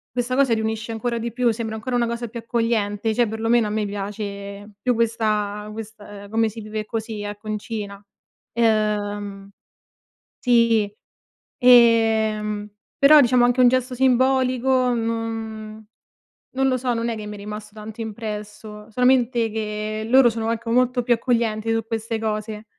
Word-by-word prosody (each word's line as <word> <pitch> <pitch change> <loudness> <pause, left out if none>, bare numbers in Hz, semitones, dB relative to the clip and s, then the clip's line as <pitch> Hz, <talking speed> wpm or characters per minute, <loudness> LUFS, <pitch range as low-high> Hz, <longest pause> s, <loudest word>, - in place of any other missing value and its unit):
questa 250 +1 -1
cosa 265 -3 +3
riunisce 220 0 -2
ancora 235 +1 -2
di 230 0 -4
più, 245 -1 +2
sembra 220 -1 -4
ancora 225 +4 -5
una 235 -1 +1
cosa 235 +1 -4
più 235 +1 -7
accogliente, 225 -2 -1
cioè 240 +1 +2
perlomeno 225 +1 +1
a - - -3
me 210 0 -1
piace, 200 0 -6
più 250 +2 +2
questa 215 -3 -1
quest 205 -2 -10
come 225 +1 +2
si 225 +2 -9
vive 215 0 -5
così, 220 -1 -4
ecco, 205 +1 -7
in 215 - -1
Cina. 205 -2 -6 0.5
Ehm, 205 -3 0 0.9
sì, 230 -4 +3 0.7
ehm, 220 -3 +4 0.3
però 300 +2 +7
diciamo 250 -1 +4
anche 245 +1 +1
un 250 - +7
gesto 255 0 0
simbolico 255 0 +2
non 225 -1 -4 0.7
non 270 0 +2
lo 255 -1 +2
so, 250 0 -1
non 230 0 -1
è 230 - -2
che 210 - -7
mi 210 - -6
è - - -10
rimasto 210 +1 -8
tanto 215 +1 -10
impresso, 210 -1 -7
solamente 245 -1 +2
che 215 0 -4
loro 260 0 +6
sono 225 -1 -3
anche 230 0 -3
molto 250 +1 +2
più 240 0 +3
accoglienti 225 -2 0
su 225 0 0
queste 225 0 -3
cose. 215 0 -3
225 Hz, 155 wpm, -22 LUFS, 210-235 Hz, 0.9 s, però